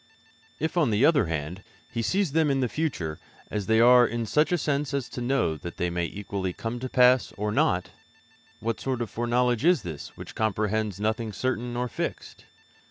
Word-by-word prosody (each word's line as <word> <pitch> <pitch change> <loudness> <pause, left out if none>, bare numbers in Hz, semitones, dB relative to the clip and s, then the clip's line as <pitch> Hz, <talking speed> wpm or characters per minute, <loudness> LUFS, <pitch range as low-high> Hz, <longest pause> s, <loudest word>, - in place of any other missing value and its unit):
If, 160 +4 -2
on 155 -7 +3
the 110 +5 +3
other 145 - +4
hand, 80 +3 -4 0.3
He 115 -2 -3
sees 190 - +1
them 160 0 +2
in 135 -1 +1
the 130 - +1
future 110 - -3 0.3
as 105 -2 -3
they 110 0 +4
are 125 +1 +7
in 120 0 -3
such 150 +9 +2
a 175 - +3
sense 145 -2 -1
as 135 -3 -2
to 125 - -6
know 120 -11 +1
that 85 +3 -8
they 90 0 -1
may 85 0 -1
equally 95 0 -4
come 115 +5 -4
to 130 +1 -4
pass 125 0 +4
or 105 +1 -1
not, 90 -3 +1 0.7
what 115 0 -2
sort 130 -3 -1
of 110 - -8
foreknowledge 120 +1 +1
is 175 -2 +4
this 80 -5 -8
which - - -9
comprehends 110 -2 -1
nothing 110 +1 -1
certain 125 +2 -2
nor 125 +1 -1
fixed? - - -5
120 Hz, 195 wpm, -26 LUFS, 100-130 Hz, 0.7 s, are